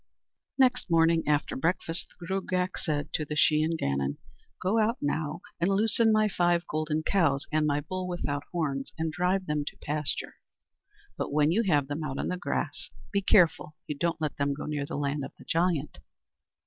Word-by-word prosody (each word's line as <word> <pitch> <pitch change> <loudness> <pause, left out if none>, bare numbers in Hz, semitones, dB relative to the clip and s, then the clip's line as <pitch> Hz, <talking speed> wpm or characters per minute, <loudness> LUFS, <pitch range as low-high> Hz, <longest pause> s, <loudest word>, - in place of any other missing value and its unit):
Next 250 -5 +3
morning 165 0 +4
after 150 -1 +1
breakfast 165 +3 -1
the 175 - -8
Gruagach 185 0 -1
said 145 -3 -2
to 155 - 0
the 150 0 -4
Shee 150 +1 +4
an 160 +1 +1
Gannon: 70 - -1 0.4
"Go 195 +5 +1
out 220 +2 +2
now 155 +3 -2 0.2
and 170 +3 +2
loosen 220 +3 +4
my 215 0 +4
five 175 -3 +1
golden 155 0 -1
cows 155 -8 +2
and 155 0 +2
my 145 0 +1
bull 185 +4 -4
without 145 -5 -2
horns, 140 -6 -2
and 160 0 -1
drive 180 +3 0
them 150 -2 -1
to - - -7
pasture; 150 0 -2 0.8
but - - -2
when 150 +1 +3
you 210 +7 +3
have 145 -3 +3
them 145 +3 -3
out 140 -3 -3
on - - -2
the 180 - -1
grass, 180 - -3 0.2
be 200 - +2
careful 175 -5 +3
you 150 - -4
don't 165 +2 -1
let 155 -2 -2
them 140 0 0
go 150 - -6
near 145 -2 -2
the - - -4
land 145 0 -1
of 135 - -7
the - - -15
giant." 165 -3 0
160 Hz, 190 wpm, -28 LUFS, 145-180 Hz, 0.8 s, morning